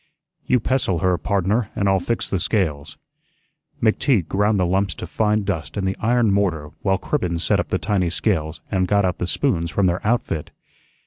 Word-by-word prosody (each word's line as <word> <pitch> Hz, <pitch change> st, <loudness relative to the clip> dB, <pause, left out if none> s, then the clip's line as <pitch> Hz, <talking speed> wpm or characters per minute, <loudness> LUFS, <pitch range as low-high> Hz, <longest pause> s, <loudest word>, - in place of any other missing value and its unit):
"You 125 Hz, -, +3 dB
pestle 120 Hz, -6 st, 0 dB
her, 90 Hz, 0 st, +2 dB
pardner, 100 Hz, +3 st, 0 dB
an' 100 Hz, -, 0 dB
I'll 95 Hz, -1 st, +3 dB
fix 115 Hz, +6 st, -2 dB
the 95 Hz, -, -1 dB
scales." 85 Hz, -7 st, -1 dB, 0.9 s
McTeague 110 Hz, -, +2 dB
ground 105 Hz, +1 st, +1 dB
the 90 Hz, -, +2 dB
lumps 95 Hz, +2 st, 0 dB
to -, -, -6 dB
fine 105 Hz, +4 st, 0 dB
dust 85 Hz, -4 st, -3 dB
in 100 Hz, -, -1 dB
the 95 Hz, 0 st, 0 dB
iron 115 Hz, -2 st, +2 dB
mortar 85 Hz, -7 st, 0 dB
while 95 Hz, -1 st, +2 dB
Cribbens 85 Hz, -2 st, -2 dB
set -, -, +2 dB
up -, -, -1 dB
the -, -, 0 dB
tiny 95 Hz, -5 st, 0 dB
scales 80 Hz, -1 st, -1 dB
and 95 Hz, -2 st, +1 dB
got 100 Hz, +1 st, +3 dB
out 90 Hz, -, -1 dB
the 90 Hz, -, -2 dB
"spoons" 85 Hz, -9 st, 0 dB
from 100 Hz, +3 st, +1 dB
their 90 Hz, 0 st, +1 dB
outfit. 105 Hz, -9 st, -1 dB
95 Hz, 190 wpm, -22 LUFS, 90-105 Hz, 0.9 s, You